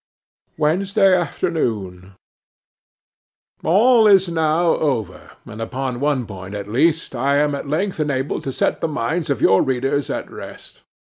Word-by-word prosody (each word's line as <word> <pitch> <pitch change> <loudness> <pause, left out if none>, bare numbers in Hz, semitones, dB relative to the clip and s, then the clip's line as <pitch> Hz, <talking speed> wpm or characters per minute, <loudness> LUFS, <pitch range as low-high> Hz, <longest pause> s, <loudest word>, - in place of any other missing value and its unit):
'Wednesday 190 +5 +2
afternoon. 110 - -3 1.5
'ALL 220 +6 +5
is 195 -2 +5
now 165 +1 +1
over; 115 - -3 0.2
and, 110 +2 -9
upon 130 +1 -4
one 140 -3 0
point 95 -1 -9
at 100 -1 -6
least, 155 +7 0
I 135 +3 +1
am 145 0 +2
at 140 0 -5
length 180 +5 -1
enabled 140 -2 -2
to 135 - -2
set - - -1
the - - 0
minds 155 +3 -2
of 140 -5 -1
your 95 - +5
readers 135 +2 -1
at - - -4
rest. - - -11
145 Hz, 140 wpm, -20 LUFS, 120-165 Hz, 1.5 s, ALL